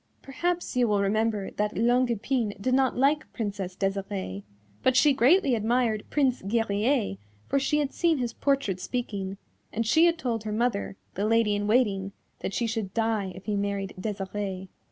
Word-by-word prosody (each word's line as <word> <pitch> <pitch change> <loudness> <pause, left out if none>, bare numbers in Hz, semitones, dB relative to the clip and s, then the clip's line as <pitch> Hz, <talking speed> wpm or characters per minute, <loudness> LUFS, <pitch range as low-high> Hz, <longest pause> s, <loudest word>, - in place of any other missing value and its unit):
Perhaps 345 +4 -2
you 250 -1 +3
will 205 -2 +2
remember 210 0 0
that 210 0 -2
Longue 245 +2 +3
Epine 230 -1 -1
did 255 +5 0
not 260 -1 +2
like 285 +4 +2
Princess 200 -4 -4
Desirée, 195 - -3 0.4
but 260 0 +3
she 290 +1 +6
greatly 275 +4 +4
admired 225 -1 +1
Prince 270 -4 +1
Guerrier, 220 - 0 0.3
for 275 - +2
she 275 +2 +1
had 290 -2 -1
seen 335 -3 +2
his 240 -3 -2
portrait 275 -11 0
speaking, 200 -3 -3 0.3
and 230 +1 -1
she 320 +10 +5
had 335 0 +2
told 235 -7 -2
her 215 - -4
mother, 215 -3 -1 0.2
the 200 +3 -1
Lady 225 -2 +3
in 205 0 -1
Waiting, 200 -4 +2 0.3
that 195 - -4
she 240 - 0
should 220 -4 -3
die 220 -4 0
if 190 0 -11
he 210 - -1
married 200 -1 -2
Desirée. 195 -1 -4
225 Hz, 175 wpm, -27 LUFS, 200-255 Hz, 0.4 s, she